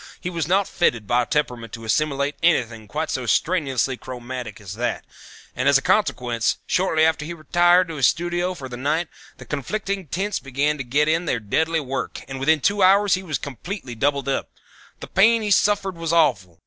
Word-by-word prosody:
He 180 Hz, -, -4 dB
was 165 Hz, -4 st, -2 dB
not 190 Hz, +2 st, +2 dB
fitted 120 Hz, -10 st, 0 dB
by 120 Hz, +3 st, +2 dB
temperament 125 Hz, -6 st, -2 dB
to 115 Hz, -, -7 dB
assimilate 140 Hz, +3 st, 0 dB
anything 115 Hz, -10 st, +1 dB
quite 155 Hz, +8 st, -3 dB
so 125 Hz, -2 st, -3 dB
strenuously 135 Hz, -5 st, +1 dB
chromatic 125 Hz, -3 st, -7 dB
as 100 Hz, -3 st, -8 dB
that, 120 Hz, +1 st, -3 dB, 0.5 s
and -, -, +2 dB
as -, -, +6 dB
a -, -, -2 dB
consequence 120 Hz, -2 st, +1 dB
shortly 160 Hz, -4 st, +2 dB
after 160 Hz, -1 st, +1 dB
he 150 Hz, -, -7 dB
had -, -, -11 dB
retired 175 Hz, +3 st, +3 dB
to 160 Hz, -, -6 dB
his 135 Hz, -, +5 dB
studio 175 Hz, +2 st, -1 dB
for 135 Hz, -6 st, -7 dB
the 120 Hz, -1 st, -7 dB
night 150 Hz, +6 st, -1 dB, 0.3 s
the -, -, -11 dB
conflicting 195 Hz, -, -3 dB
tints 195 Hz, +7 st, -2 dB
began 140 Hz, +3 st, -1 dB
to -, -, -2 dB
get 145 Hz, +5 st, +1 dB
in 165 Hz, +2 st, +1 dB
their 125 Hz, -7 st, 0 dB
deadly 160 Hz, +10 st, 0 dB
work 135 Hz, -2 st, -4 dB
and 135 Hz, -1 st, -6 dB
within 155 Hz, +3 st, +2 dB
two 200 Hz, +5 st, +1 dB
hours 195 Hz, +1 st, +5 dB
he 185 Hz, -, +1 dB
was 155 Hz, -7 st, -3 dB
completely 140 Hz, -, -7 dB
doubled 140 Hz, +3 st, 0 dB
up. 135 Hz, -, -1 dB, 0.5 s
The -, -, -5 dB
pain 225 Hz, +3 st, +4 dB
he 210 Hz, -, -2 dB
suffered 195 Hz, -2 st, +2 dB
was 165 Hz, -1 st, -3 dB
awful. 95 Hz, -, +1 dB
150 Hz, 200 wpm, -22 LUFS, 125-175 Hz, 0.5 s, as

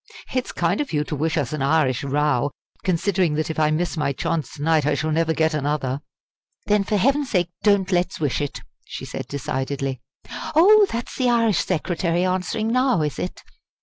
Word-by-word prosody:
It's 255 Hz, -1 st, -1 dB
kind 175 Hz, -, 0 dB
of 290 Hz, -, -4 dB
you 150 Hz, -1 st, +1 dB
to 150 Hz, -, -4 dB
wish 155 Hz, +3 st, -1 dB
us 145 Hz, -2 st, -1 dB
an 155 Hz, -, -3 dB
Irish 140 Hz, -3 st, +2 dB
row! 145 Hz, -1 st, +1 dB, 0.3 s
considering 180 Hz, -2 st, +1 dB
that 155 Hz, +1 st, -1 dB
if 160 Hz, -, -4 dB
I 155 Hz, -1 st, +3 dB
miss 170 Hz, +4 st, -1 dB
my 145 Hz, -2 st, +1 dB
chance 160 Hz, +3 st, -2 dB
to 145 Hz, -, -6 dB
night 160 Hz, -1 st, +3 dB
I 150 Hz, +1 st, +1 dB
shall 155 Hz, 0 st, -1 dB
never 160 Hz, +1 st, +1 dB
get 160 Hz, -1 st, +1 dB
another!" 145 Hz, -2 st, -1 dB, 0.6 s
"Then 210 Hz, -1 st, +3 dB
for 210 Hz, +1 st, 0 dB
heaven's 275 Hz, +6 st, +2 dB
sake 175 Hz, -5 st, +1 dB
don't 200 Hz, -2 st, +3 dB
let's 180 Hz, 0 st, 0 dB
wish 145 Hz, -2 st, 0 dB
it!" 145 Hz, -, -4 dB, 0.2 s
she -, -, -7 dB
said -, -, -6 dB
decidedly. 135 Hz, -1 st, -3 dB, 0.5 s
"Oh, 405 Hz, +5 st, +7 dB
that's 235 Hz, +1 st, -4 dB
the 255 Hz, -2 st, +2 dB
Irish 230 Hz, -4 st, +3 dB
Secretary 175 Hz, 0 st, 0 dB
answering 185 Hz, +4 st, -1 dB
now, 255 Hz, -7 st, +2 dB
is 150 Hz, -9 st, -3 dB
it?" 90 Hz, -, -5 dB
160 Hz, 190 wpm, -23 LUFS, 150-200 Hz, 0.6 s, Oh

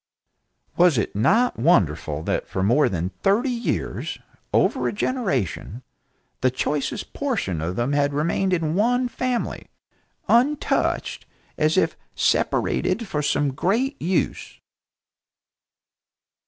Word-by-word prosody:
Was 175 Hz, -6 st, +5 dB
it 105 Hz, -, -1 dB
not 225 Hz, -, +2 dB
wonderful 80 Hz, -, +2 dB
that -, -, -2 dB
for 95 Hz, -, -2 dB
more 120 Hz, +9 st, +3 dB
than 90 Hz, 0 st, -2 dB
thirty 220 Hz, +7 st, +2 dB
years, 240 Hz, -1 st, -3 dB, 0.3 s
over -, -, +2 dB
a -, -, 0 dB
generation, 140 Hz, -, -2 dB, 0.6 s
the 130 Hz, -, +4 dB
choicest 140 Hz, +3 st, -3 dB
portion 200 Hz, -, -2 dB
of 85 Hz, +3 st, -3 dB
them 120 Hz, +6 st, 0 dB
had 145 Hz, 0 st, +2 dB
remained 170 Hz, +6 st, 0 dB
in 165 Hz, -3 st, 0 dB
one 245 Hz, +6 st, +2 dB
family, 250 Hz, -1 st, -3 dB, 0.6 s
untouched, 275 Hz, +5 st, +1 dB, 0.3 s
as -, -, +1 dB
if, -, -, +2 dB, 0.2 s
separated 210 Hz, +4 st, +1 dB
for 150 Hz, -5 st, -2 dB
some 145 Hz, -1 st, +1 dB
great 235 Hz, -, 0 dB
use! 165 Hz, -, -2 dB
165 Hz, 115 wpm, -23 LUFS, -, 0.6 s, Was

